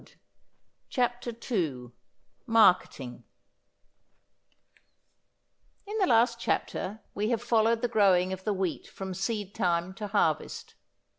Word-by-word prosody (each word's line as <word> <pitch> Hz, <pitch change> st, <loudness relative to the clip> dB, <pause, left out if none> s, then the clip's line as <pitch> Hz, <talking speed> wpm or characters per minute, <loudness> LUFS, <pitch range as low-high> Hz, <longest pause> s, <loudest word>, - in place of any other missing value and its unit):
CHAPTER 245 Hz, -1 st, -1 dB, 0.2 s
II 135 Hz, -, -1 dB, 0.6 s
MARKETING 180 Hz, -, +3 dB, 2.6 s
In 415 Hz, +2 st, -4 dB
the 380 Hz, -, +3 dB
last 235 Hz, -1 st, +3 dB
chapter 215 Hz, -2 st, -2 dB
we 210 Hz, +2 st, -1 dB
have 235 Hz, -2 st, +1 dB
followed 225 Hz, 0 st, +2 dB
the -, -, +3 dB
growing 190 Hz, -5 st, +3 dB
of 190 Hz, 0 st, -7 dB
the 215 Hz, -, 0 dB
wheat 190 Hz, -4 st, -2 dB
from 190 Hz, -1 st, -6 dB
seed 200 Hz, +1 st, -3 dB
time 175 Hz, -2 st, 0 dB
to 210 Hz, +2 st, -6 dB
harvest. 190 Hz, -7 st, -1 dB
205 Hz, 105 wpm, -28 LUFS, 185-230 Hz, 2.6 s, MARKETING